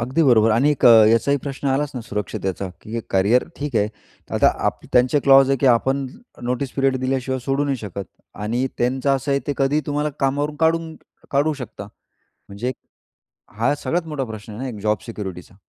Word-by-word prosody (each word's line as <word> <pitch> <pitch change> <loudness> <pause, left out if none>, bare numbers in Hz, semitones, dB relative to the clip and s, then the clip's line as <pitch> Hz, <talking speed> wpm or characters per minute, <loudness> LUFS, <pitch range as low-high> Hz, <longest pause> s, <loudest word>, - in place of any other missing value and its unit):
अगदी 130 +8 +1
बरोबर. 115 -5 +5
आणि 135 +7 +3
अ, - - +9 0.2
याचाही 130 +5 +3
प्रश्न 140 0 -5
आलाच 140 +2 0
ना 125 - -4
सुरक्षितेचा, 100 -3 -4
की 110 - -13
हे 115 - -1
करिअर 100 +6 +3
ठीक 145 -5 -3
आहे. 105 0 +2 0.5
आता - - +5 0.2
आप - - -1
त्यांचे 125 +4 +4
क्लॉज 135 0 +6
आहेत 135 - +2
की 135 - +3
आपण 130 +3 +2
ज् 235 - -16
नोटीस 125 +2 -2
पिरियड 135 -1 +2
दिल्याशिवाय 130 0 -1
सोडू 140 +1 0
नाही 140 -2 0
शकत 100 -3 -6 0.4
आणि 120 +5 0
त्यांचं 130 +3 +1
असं 140 +2 -4
आहे, 140 - +1
ते 145 - 0
कधीही 140 +3 +2
तुम्हाला 150 +1 -1
कामावरून 145 +2 0
काढून 160 0 +1 0.4
काढू 145 +3 +2
शकतात. 105 -3 -9 0.6
म्हणजे 115 +6 -3 0.9
हा 115 +5 +2
सगळ्यात 165 +3 -2
मोठा 150 -3 -3
प्रश्न 110 -1 -9
आहे 115 - -7
ना 135 - -3
एक 105 -4 -8
जॉब 105 -1 +2
सिक्युरिटीचा. 95 -5 -7
130 Hz, 185 wpm, -21 LUFS, 115-140 Hz, 0.9 s, अ